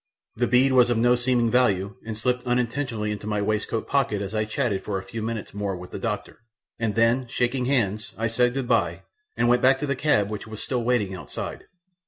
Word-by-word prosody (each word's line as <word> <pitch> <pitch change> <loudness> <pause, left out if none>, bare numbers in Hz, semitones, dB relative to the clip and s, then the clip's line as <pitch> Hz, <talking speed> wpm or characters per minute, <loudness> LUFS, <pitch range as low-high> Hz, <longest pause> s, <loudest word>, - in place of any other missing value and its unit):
The 120 +2 +1
bead 130 +2 +4
was 125 -1 +5
of 120 - +2
no 120 +2 +4
seeming 120 -1 +2
value 100 -6 +2
and 110 -1 -5
slipped 125 +2 0
unintentionally 120 -3 -1
into 105 0 -5
my 105 -1 0
waistcoat 105 +2 -1
pocket 135 -7 +1
as 100 +1 -5
I 110 0 0
chatted 110 -3 -1
for 100 -2 -2
a 95 - -5
few 110 +4 -6
minutes 110 -3 -4
more 100 -1 -2
with 90 0 -10
the - - -5
doctor, - - -4 0.4
and 115 -3 -1
then, 115 +3 +3
shaking 125 +2 0
hands, 110 -5 0
I 115 - -1
said 120 +2 +2
goodbye, 125 -3 0 0.3
and 120 - +2
went 120 +1 +4
back 130 +1 +5
to 150 - -3
the 140 -1 -1
cab 110 -8 +2
which 105 +1 -5
was 110 -1 -7
still 125 -3 -2
waiting 115 -5 +1
outside. 90 - -6
115 Hz, 215 wpm, -25 LUFS, 105-125 Hz, 0.4 s, was